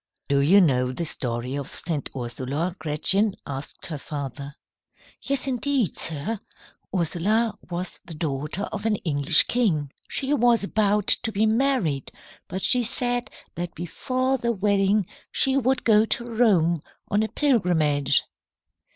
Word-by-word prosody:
"Do 140 Hz, 0 st, +3 dB
you 175 Hz, +9 st, +6 dB
know 125 Hz, -6 st, +2 dB
the 150 Hz, +7 st, -3 dB
story 125 Hz, -2 st, -2 dB
of 140 Hz, -2 st, -5 dB
St. 160 Hz, -4 st, -3 dB
Ursula, 130 Hz, +8 st, -3 dB
Gretchen?" 190 Hz, +7 st, +1 dB
asked 140 Hz, 0 st, -6 dB
her 155 Hz, -4 st, -5 dB
father. 140 Hz, -1 st, -6 dB, 0.7 s
"Yes, 275 Hz, -1 st, -1 dB
indeed, 265 Hz, -, 0 dB
sir. 165 Hz, +8 st, -1 dB, 0.5 s
Ursula 195 Hz, +6 st, +1 dB, 0.2 s
was 175 Hz, +1 st, -5 dB
the 165 Hz, -, -8 dB
daughter 150 Hz, +4 st, -3 dB
of 215 Hz, +1 st, -3 dB
an 215 Hz, -, +2 dB
English 145 Hz, 0 st, +4 dB
king. 165 Hz, -, 0 dB, 0.2 s
She 275 Hz, +1 st, 0 dB
was 240 Hz, -4 st, +3 dB
about 205 Hz, 0 st, +1 dB
to 225 Hz, -, +3 dB
be 210 Hz, +1 st, +1 dB
married, 220 Hz, -, +1 dB, 0.4 s
but 190 Hz, +2 st, -5 dB
she 250 Hz, -, +4 dB
said 245 Hz, +1 st, 0 dB, 0.2 s
that 175 Hz, 0 st, -5 dB
before 255 Hz, +10 st, -1 dB
the 235 Hz, 0 st, 0 dB
wedding 200 Hz, -1 st, +2 dB, 0.3 s
she 265 Hz, 0 st, +2 dB
would 260 Hz, -1 st, +1 dB
go 215 Hz, -1 st, +5 dB
to 235 Hz, +1 st, 0 dB
Rome 195 Hz, -9 st, +2 dB, 0.3 s
on 205 Hz, -, +3 dB
a 220 Hz, -, 0 dB
pilgrimage. 175 Hz, -, +2 dB
190 Hz, 140 wpm, -24 LUFS, 150-230 Hz, 0.7 s, you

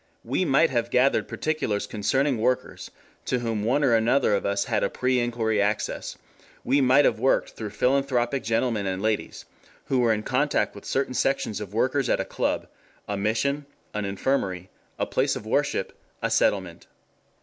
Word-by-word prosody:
"We 185 Hz, -, 0 dB
might 150 Hz, +1 st, +3 dB
have 120 Hz, -2 st, 0 dB
gathered 130 Hz, +3 st, +2 dB
particulars 155 Hz, -10 st, -2 dB
concerning 130 Hz, +5 st, 0 dB
workers 125 Hz, +3 st, -1 dB, 0.4 s
to 125 Hz, -, 0 dB
whom 115 Hz, -3 st, -2 dB
one 135 Hz, +7 st, +2 dB
or 130 Hz, -4 st, +4 dB
another 115 Hz, +2 st, +3 dB
of 100 Hz, -, 0 dB
us 100 Hz, 0 st, +1 dB
had 110 Hz, -3 st, 0 dB
a -, -, +1 dB
pre 125 Hz, 0 st, 0 dB
inquiry 115 Hz, -3 st, 0 dB
access; 105 Hz, +1 st, -2 dB, 0.5 s
we 140 Hz, +3 st, +2 dB
might 135 Hz, +2 st, +5 dB
have 110 Hz, -, +2 dB
worked 130 Hz, +3 st, +2 dB
through 110 Hz, -2 st, -6 dB
philanthropic 130 Hz, +2 st, +1 dB
gentlemen 115 Hz, -2 st, 0 dB
and 95 Hz, 0 st, -2 dB
ladies 110 Hz, +1 st, -2 dB, 0.4 s
who 130 Hz, -, +1 dB
were 120 Hz, -2 st, +3 dB
in 105 Hz, -1 st, 0 dB
contact 140 Hz, +5 st, +1 dB
with -, -, -12 dB
certain 135 Hz, -1 st, -1 dB
sections 135 Hz, -6 st, 0 dB
of 105 Hz, 0 st, -7 dB
workers 130 Hz, +4 st, +1 dB
at -, -, +2 dB
a -, -, -1 dB
club, -, -, -1 dB, 0.4 s
a 105 Hz, -, -2 dB
mission, 125 Hz, +8 st, -1 dB, 0.3 s
an 105 Hz, -1 st, -2 dB
infirmary, 95 Hz, -3 st, -2 dB, 0.3 s
a -, -, 0 dB
place -, -, 0 dB
of -, -, -7 dB
worship, -, -, -1 dB, 0.2 s
a -, -, -2 dB
settlement. 95 Hz, -4 st, 0 dB
120 Hz, 170 wpm, -25 LUFS, 105-135 Hz, 0.5 s, might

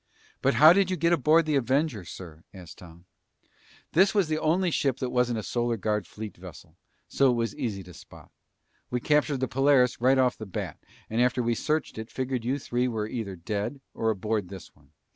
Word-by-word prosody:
"But 135 Hz, -, +2 dB
how 155 Hz, +3 st, +8 dB
did 195 Hz, 0 st, +2 dB
you 185 Hz, -, -1 dB
get 170 Hz, +2 st, +2 dB
aboard 160 Hz, +1 st, +4 dB
the 155 Hz, -, -1 dB
Avenger, 135 Hz, -, 0 dB
sir?" 85 Hz, -2 st, -10 dB
asked 90 Hz, -3 st, -12 dB
Tom. 85 Hz, 0 st, -14 dB, 0.9 s
"This 195 Hz, +5 st, +3 dB
was 195 Hz, -6 st, +2 dB
the 155 Hz, 0 st, 0 dB
only 175 Hz, +4 st, +1 dB
ship 135 Hz, -4 st, 0 dB
that 130 Hz, -2 st, -3 dB
wasn't 125 Hz, -2 st, +1 dB
a 110 Hz, -, -4 dB
Solar 120 Hz, 0 st, -1 dB
Guard 105 Hz, -2 st, -2 dB
fleet 105 Hz, -3 st, -8 dB
vessel, -, -, -13 dB, 0.3 s
so 135 Hz, -1 st, +3 dB
it 125 Hz, -, +2 dB
was 115 Hz, -2 st, -1 dB
easy 100 Hz, -5 st, -4 dB
to 90 Hz, 0 st, -13 dB
spot. -, -, -15 dB, 0.6 s
We 125 Hz, -, -1 dB
captured 150 Hz, 0 st, +1 dB
the 130 Hz, -, +1 dB
Polaris 130 Hz, -1 st, +3 dB
right 130 Hz, +2 st, +4 dB
off 130 Hz, -1 st, +2 dB
the 110 Hz, -, -7 dB
bat, 95 Hz, -, -5 dB, 0.3 s
and 115 Hz, +2 st, -1 dB
after 125 Hz, 0 st, +2 dB
we 120 Hz, 0 st, +1 dB
searched 155 Hz, -1 st, -2 dB
it, 110 Hz, +1 st, -7 dB
figured 130 Hz, -2 st, -3 dB
you 130 Hz, +4 st, -1 dB
three 125 Hz, -2 st, -1 dB
were 110 Hz, -3 st, -2 dB
either 110 Hz, -4 st, -5 dB
dead, 105 Hz, +9 st, -4 dB
or 115 Hz, -, -1 dB
aboard 105 Hz, -2 st, -2 dB
this 95 Hz, -3 st, -11 dB
one. 70 Hz, -2 st, -26 dB
125 Hz, 205 wpm, -27 LUFS, 105-140 Hz, 0.9 s, how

